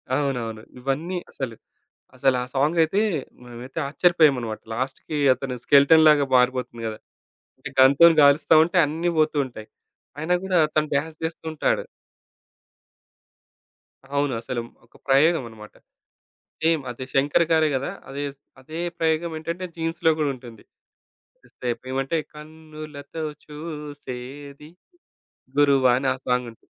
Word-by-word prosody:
అవునవును. 120 Hz, -6 st, -2 dB, 0.2 s
ఇవన్నీ 145 Hz, +8 st, -2 dB
అసలు. 130 Hz, -4 st, -5 dB, 0.6 s
అసలా 130 Hz, -1 st, +2 dB
సాంగయితే 160 Hz, +6 st, +2 dB, 0.4 s
మేమైతే 120 Hz, +4 st, -9 dB
ఆశ్చర్యపోయామన్నమాట. 140 Hz, -8 st, +2 dB
లాస్ట్‌కి 135 Hz, +5 st, -4 dB, 0.2 s
అతను 130 Hz, 0 st, -5 dB
స్కెలెటన్‌లాగా 150 Hz, +1 st, +6 dB
మారిపోతుంది 125 Hz, -2 st, 0 dB
గదా! 110 Hz, -1 st, -5 dB, 0.8 s
గన్‌తోని 145 Hz, +5 st, +7 dB
కాలుస్తా 145 Hz, +3 st, +5 dB
ఉంటే 175 Hz, +3 st, -4 dB
అన్నీ 165 Hz, +4 st, -1 dB
పోతూ 155 Hz, 0 st, +2 dB
ఉంటాయి. 110 Hz, -4 st, -11 dB, 0.5 s
అయినా 160 Hz, +4 st, 0 dB
గూడా 185 Hz, -2 st, +2 dB, 0.2 s
తను 155 Hz, 0 st, +2 dB
డాన్స్ 155 Hz, +2 st, -2 dB
జేస్తూంటాడు. 160 Hz, -1 st, -2 dB, 2.3 s
అవును. 140 Hz, -1 st, +1 dB
అసలు 120 Hz, +1 st, -4 dB, 0.2 s
ఒక 115 Hz, -, -33 dB
ప్రయోగం 145 Hz, +3 st, +4 dB
అన్నమాట. 110 Hz, -2 st, -13 dB, 0.9 s
సేమ్ 160 Hz, -1 st, +3 dB
అది 120 Hz, +2 st, -7 dB
శంకర్ 145 Hz, +5 st, +3 dB
గారే 160 Hz, -1 st, +4 dB
కదా! 135 Hz, +1 st, -2 dB, 0.2 s
అదే 140 Hz, +1 st, -4 dB
స్ -, -, -35 dB, 0.2 s
అదే 155 Hz, +5 st, -8 dB, 0.2 s
ప్రయోగం 165 Hz, +1 st, 0 dB
ఏంటంటే 170 Hz, +3 st, -4 dB
'జీన్స్‌లో' 165 Hz, 0 st, +1 dB
గూడా 145 Hz, -2 st, +1 dB
ఉంటుంది. 120 Hz, -3 st, -13 dB, 1.3 s
ఏమంటే 135 Hz, +4 st, -1 dB, 0.2 s
కన్నులతో 155 Hz, -1 st, -9 dB, 0.2 s
చూసేది 145 Hz, -2 st, -8 dB, 0.9 s
'గురువా' 135 Hz, -3 st, +4 dB
అని 135 Hz, 0 st, -1 dB
ఆ -, -, -7 dB
సాంగుంటుంది. 125 Hz, -2 st, -2 dB
145 Hz, 105 wpm, -24 LUFS, 130-160 Hz, 2.3 s, గన్‌తోని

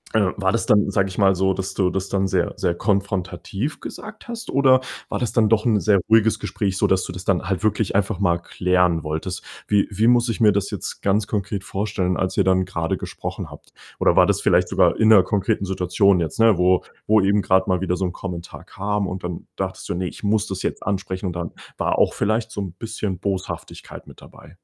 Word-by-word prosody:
äh, 100 Hz, -4 st, +3 dB
war 95 Hz, -1 st, +1 dB
das 115 Hz, -, 0 dB
dann, 105 Hz, -1 st, +3 dB
sage 100 Hz, -1 st, +1 dB
ich 90 Hz, -, -9 dB
mal, 95 Hz, -2 st, +4 dB
so, 95 Hz, +1 st, +1 dB
dass 95 Hz, +1 st, -4 dB
du 95 Hz, -2 st, +1 dB
das 95 Hz, +1 st, -3 dB
dann 95 Hz, -1 st, 0 dB
sehr 90 Hz, -2 st, 0 dB
sehr 85 Hz, -, 0 dB
konfrontativ 100 Hz, -, -2 dB
gesagt 215 Hz, +2 st, -9 dB
hast? 235 Hz, -1 st, -6 dB
Oder 130 Hz, -1 st, +4 dB, 0.3 s
war -, -, -2 dB
das 120 Hz, -4 st, -1 dB
dann 110 Hz, -3 st, +3 dB
doch 110 Hz, 0 st, +2 dB
'n 110 Hz, -3 st, +3 dB
sehr 100 Hz, +2 st, +3 dB
ruhiges 110 Hz, 0 st, +4 dB
Gespräch, 95 Hz, -3 st, -2 dB
sodass 95 Hz, -1 st, +2 dB
du -, -, -6 dB
das 90 Hz, +1 st, -7 dB
dann 95 Hz, -3 st, +2 dB
halt 95 Hz, +2 st, -1 dB
wirklich 105 Hz, -1 st, 0 dB
einfach 100 Hz, -1 st, 0 dB
mal 85 Hz, -4 st, +2 dB
klären 90 Hz, -1 st, +1 dB
wolltest? 80 Hz, +4 st, -4 dB, 0.2 s
Wie 105 Hz, -1 st, +2 dB
wie 105 Hz, +3 st, 0 dB
muss 120 Hz, 0 st, +4 dB
ich 115 Hz, -, -2 dB
mir 105 Hz, -2 st, +6 dB
das 100 Hz, 0 st, -1 dB
jetzt -, -, -6 dB
ganz 100 Hz, +1 st, +1 dB
konkret 100 Hz, -1 st, -3 dB
vorstellen, 95 Hz, -3 st, -2 dB
als 95 Hz, -, -2 dB
ihr -, -, +4 dB
dann 95 Hz, 0 st, +2 dB
grade 85 Hz, -3 st, -2 dB
gesprochen -, -, -6 dB
habt? -, -, -15 dB, 0.3 s
Oder -, -, +3 dB
war -, -, +6 dB
das -, -, +1 dB
vielleicht -, -, +3 dB
sogar -, -, +2 dB
in 110 Hz, -, +4 dB
'ner 100 Hz, -4 st, +7 dB
konkreten 100 Hz, +1 st, 0 dB
Situation 95 Hz, +1 st, +2 dB
jetzt, 85 Hz, +5 st, -3 dB
ne, 115 Hz, -5 st, +5 dB
wo 90 Hz, 0 st, +3 dB, 0.2 s
wo 110 Hz, +1 st, +5 dB
eben 100 Hz, +2 st, +2 dB
grad 95 Hz, 0 st, +2 dB
mal 95 Hz, -1 st, +1 dB
wieder 90 Hz, -1 st, 0 dB
so 95 Hz, -, -2 dB
'n 90 Hz, -, -2 dB
Kommentar 90 Hz, -2 st, -7 dB
kam 100 Hz, 0 st, -2 dB
und 90 Hz, 0 st, -6 dB
dann 90 Hz, -1 st, -6 dB
dachtest -, -, -5 dB
du: -, -, -1 dB
„Ne, 90 Hz, 0 st, -2 dB
ich -, -, -9 dB
muss 105 Hz, +1 st, +1 dB
das 95 Hz, -1 st, -4 dB
jetzt -, -, -3 dB
ansprechen“ 95 Hz, -1 st, -3 dB
und 90 Hz, -, -3 dB
dann 85 Hz, -1 st, -4 dB, 0.3 s
war -, -, 0 dB
auch -, -, +3 dB
vielleicht 110 Hz, +2 st, -1 dB
so 105 Hz, -, -4 dB
'n 90 Hz, -4 st, -5 dB
bisschen 110 Hz, -3 st, -4 dB
Boshaftigkeit 95 Hz, -1 st, -5 dB
mit -, -, -15 dB
dabei? 75 Hz, -, -15 dB
95 Hz, 230 wpm, -22 LUFS, 90-105 Hz, 0.3 s, ner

